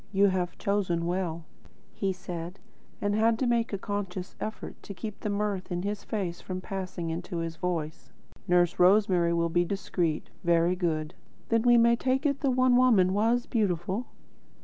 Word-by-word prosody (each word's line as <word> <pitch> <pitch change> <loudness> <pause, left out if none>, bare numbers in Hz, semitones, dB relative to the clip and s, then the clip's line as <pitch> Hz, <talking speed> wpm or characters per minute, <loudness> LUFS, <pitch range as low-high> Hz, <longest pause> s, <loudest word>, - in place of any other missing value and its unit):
"You 200 0 +4
have 180 -2 -2
chosen 185 -4 0
well," 170 -2 -2 0.5
he 195 -1 -1
said, 180 -1 -6 0.4
and 205 0 0
had 225 +2 +3
to 260 - 0
make 235 -1 +1
a 200 - -1
conscious 195 -2 -4
effort 220 - -6
to 200 - -9
keep 215 +1 -6
the 210 - -3
mirth 200 -2 -2
in 175 0 -2
his 205 0 -3
face 185 -5 -3
from 185 -1 -5
passing 185 -3 -4
into 170 +1 -4
his 165 -1 -3
voice. 165 -3 -3 0.4
"Nurse 175 -1 +3
Rosemary 180 -2 +4
will 170 0 +1
be 175 +1 +2
discreet. 175 -4 -2
Very 170 +1 +3
good. 160 -3 -1 0.4
Then 230 -1 +3
we 240 0 +5
may 235 0 +5
take 260 +4 0
it 280 -1 +1
the 280 - +1
One 255 -1 +4
Woman 215 -8 +4
was 230 +4 +2
beautiful?" 195 0 -1
190 Hz, 170 wpm, -28 LUFS, 175-215 Hz, 0.5 s, we